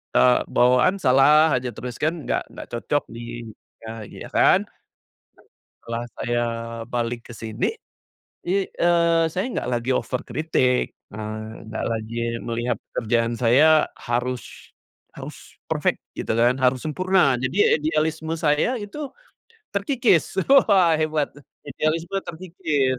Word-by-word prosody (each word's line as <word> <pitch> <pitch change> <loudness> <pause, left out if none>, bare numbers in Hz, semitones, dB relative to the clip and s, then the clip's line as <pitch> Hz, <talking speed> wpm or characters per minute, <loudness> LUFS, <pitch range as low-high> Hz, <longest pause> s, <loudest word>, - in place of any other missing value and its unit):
eee, 125 -1 +5
bawaan 125 +11 +4
salah 150 +3 +5
aja 125 -1 -2
terus 120 0 -7
kan, 155 +2 +1
nggak - - -2
nggak - - -9
cocok 130 +5 -1
di 120 0 -7 0.4
nah, 110 -1 -7
iya - - -10
kan. - - +5 1.2
Setelah 115 0 -4
saya 120 0 -1 0.5
balik 120 -1 -2
ke - - -8
sini, 110 +1 -3 0.8
i 195 +2 0
eee, 170 -1 +2
saya 185 +5 -1
nggak - - -2
lagi 120 +1 -1
over 125 +1 -1
kritik, 130 -5 +1 0.3
eee, 110 0 -5 0.3
nggak 110 - -4
lagi 110 +1 -5 0.3
melihat 120 0 -2
pekerjaan 115 +1 0
saya 150 +6 +5
harus 125 +1 -2 0.7
harus - - -8 0.3
perfect - - 0 0.2
gitu - - -2
kan, 120 +2 +3
harus 130 0 +2
sempurna. 175 -3 +2
Jadi 130 +3 -2
ya - - +4
idealisme 160 +1 -1
saya 150 +4 +1
itu 205 +8 -8 0.8
terkikis, 200 - +1 0.3
wah, 180 -5 +5
hebat, 155 -2 0 0.4
idealisme 160 +6 -2
terkikis, 155 -6 -1
130 Hz, 125 wpm, -23 LUFS, 120-160 Hz, 1.2 s, eee